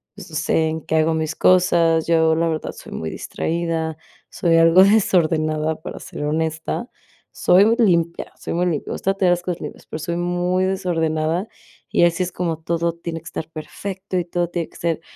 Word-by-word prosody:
pues - - -11
no - - -8
sé, 160 0 +1
en 160 0 -3
qué 160 - -1
hago 160 +1 +3
mis 160 0 -2
cosas. 170 -3 +4
Yo, 160 -1 +4
la 165 +1 +1
verdad, 155 -1 -3
soy - - -11
muy 80 - -4
distraída, 165 -1 -2 0.3
soy 165 -2 +2
algo 165 +3 +7
desordenada, 160 -6 +2
para - - -7
ser - - -7
honesta, 160 +8 -2 0.4
soy 200 +6 +4
limpia, 170 -6 +1
soy - - -4
muy 180 +1 +1
limpia, 155 -5 -2
me - - -1
gusta 195 - 0
tener 185 -2 +3
las 175 - -2
cosas 180 -1 -3
limpias, - - -8
pero 155 - -6
soy 170 +2 -3
muy 175 +1 0
desordenada, 170 -1 0 0.4
y - - +3
así 170 +2 +1
es 180 - -4
como 165 -3 -2
todo 170 +1 -1
tiene 170 -1 -6
que - - -30
estar 160 - -6
perfecto 190 +4 -5
y 175 - 0
todo 175 0 -1
tiene 170 -2 -3
que - - -16
ser 165 -1 -1
170 Hz, 195 wpm, -21 LUFS, 160-180 Hz, 0.4 s, algo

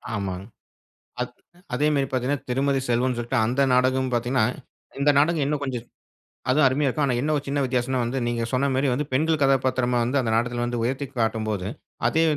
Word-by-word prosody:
ஆமாங்க. 95 -2 -4 0.8
அத் - - -6 0.4
அதேமாரி 145 0 +2
பாத்தீங்கன்னா, 130 +1 -1
திருமதி 135 +1 +1
செல்வம்னு 125 +1 +1
சொல்லிட்டு 120 +2 -1
அந்த 130 +4 +1
நாடகமும் 130 0 +2
பாத்தீங்கன்னா, 120 0 +1 0.6
இந்த 145 +1 +4
நாடகம் 155 0 +3
இன்னும் 145 0 -1
கொஞ்சம் 125 -4 -4 0.7
அதுவும் 145 +3 +4
அருமையா 140 +2 +1
இருக்கும். 145 +3 +1
ஆனா 125 - +1
என்ன 155 +3 0
ஒரு 145 - -4
சின்ன 140 +1 0
வித்தியாசன்னா 125 0 0
வந்து, 120 +3 -2
நீங்க 120 -1 -1
சொன்னமாரி 135 +1 +1
வந்து, 145 +3 -1
பெண்கள் 155 +3 +2
கதாபாத்திரமா 130 -2 +2
வந்து 130 +4 +1
அந்த 115 -3 -1
நாடகத்துல 120 +1 0
வந்து 120 -1 -2
உயர்த்தி 135 +4 -1
காட்டும்போது, 110 -4 -1 0.4
அதே 160 +7 +2
130 Hz, 170 wpm, -24 LUFS, 120-140 Hz, 0.8 s, இந்த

